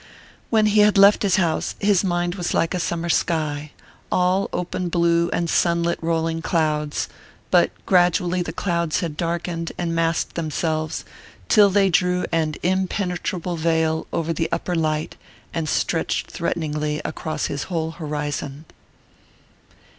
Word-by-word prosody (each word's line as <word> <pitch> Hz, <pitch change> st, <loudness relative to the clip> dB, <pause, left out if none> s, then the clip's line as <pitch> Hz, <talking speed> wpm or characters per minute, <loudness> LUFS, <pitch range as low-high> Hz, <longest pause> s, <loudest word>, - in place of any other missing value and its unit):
When 220 Hz, -2 st, +3 dB
he 210 Hz, 0 st, +3 dB
had 210 Hz, 0 st, +5 dB
left 200 Hz, +1 st, +7 dB
his 195 Hz, -3 st, +3 dB
house, 170 Hz, -5 st, 0 dB
his 200 Hz, -2 st, +2 dB
mind 175 Hz, -1 st, 0 dB
was 175 Hz, -2 st, -2 dB
like 165 Hz, -, +1 dB
a 180 Hz, -, -1 dB
summer 170 Hz, 0 st, -2 dB
sky, 155 Hz, -3 st, 0 dB, 0.4 s
all 185 Hz, +2 st, +2 dB
open 180 Hz, 0 st, -3 dB
blue 170 Hz, 0 st, +2 dB
and 170 Hz, -, -1 dB
sunlit 170 Hz, 0 st, +1 dB
rolling 165 Hz, 0 st, -1 dB
clouds; 150 Hz, -3 st, 0 dB, 0.4 s
but -, -, +5 dB, 0.2 s
gradually 180 Hz, -1 st, +3 dB
the 175 Hz, -, -3 dB
clouds 170 Hz, -2 st, -1 dB
had 165 Hz, -4 st, -3 dB
darkened 170 Hz, 0 st, -3 dB
and 170 Hz, -1 st, -2 dB
massed 165 Hz, 0 st, 0 dB
themselves, 155 Hz, -1 st, -2 dB, 0.4 s
till 210 Hz, -3 st, +6 dB
they 195 Hz, -1 st, +3 dB
drew 180 Hz, +1 st, +2 dB
an 160 Hz, -2 st, 0 dB
impenetrable 180 Hz, -1 st, -1 dB
veil 160 Hz, 0 st, +1 dB
over 165 Hz, 0 st, -1 dB
the 165 Hz, +1 st, -1 dB
upper 180 Hz, -, -2 dB
light 155 Hz, -2 st, -1 dB, 0.4 s
and 160 Hz, -2 st, -2 dB
stretched -, -, -1 dB
threateningly 150 Hz, -3 st, -2 dB
across 155 Hz, 0 st, -3 dB
his 140 Hz, -, -3 dB
whole 160 Hz, -3 st, -1 dB
horizon. 150 Hz, -2 st, -4 dB
170 Hz, 140 wpm, -22 LUFS, 160-180 Hz, 0.4 s, left